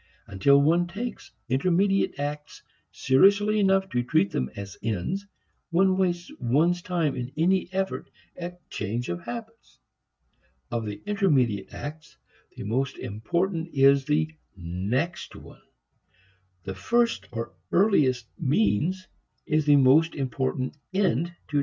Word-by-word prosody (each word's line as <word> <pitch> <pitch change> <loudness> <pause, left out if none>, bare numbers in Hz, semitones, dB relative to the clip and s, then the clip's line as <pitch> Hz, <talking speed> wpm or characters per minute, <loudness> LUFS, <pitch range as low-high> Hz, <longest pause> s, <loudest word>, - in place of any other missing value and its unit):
Until 100 +9 +4
one 170 +5 +3
takes 225 +7 -6 0.2
intermediate 185 +9 +1
acts 150 +1 -5 0.3
seriously 200 +10 +4
enough 195 -1 +3
to 125 - 0
treat 100 -5 +1
them 65 0 -1
as 100 0 -7
ends, 115 - -2 0.4
one 185 +2 +3
wastes 175 -2 -1
one's 155 +8 +2
time 170 -6 -1
in 125 0 -5
any 180 +3 +2
effort 190 0 -2 0.3
at 175 -1 -8
change 115 +5 -3
of 85 0 -3
habits. 225 -1 -8 0.9
Of 115 -2 -2
the 105 +9 -7
intermediate 150 - +1
acts, 150 +1 -8 0.4
the - - -6
most 130 +6 -1
important 165 - -2
is 135 0 +5
the 155 +2 0 0.2
next 100 - -3
one. - - -13 1.0
The 95 - -5
first 235 - 0
or 115 -4 -5 0.2
earliest 145 - +3
means 150 - +1 0.4
is 155 -1 +1
the 145 - +7
most 145 +5 +5
important 130 0 -2
end 180 - +1 0.2
to 150 - 0
discover. - - +5
150 Hz, 130 wpm, -26 LUFS, 125-185 Hz, 1.0 s, the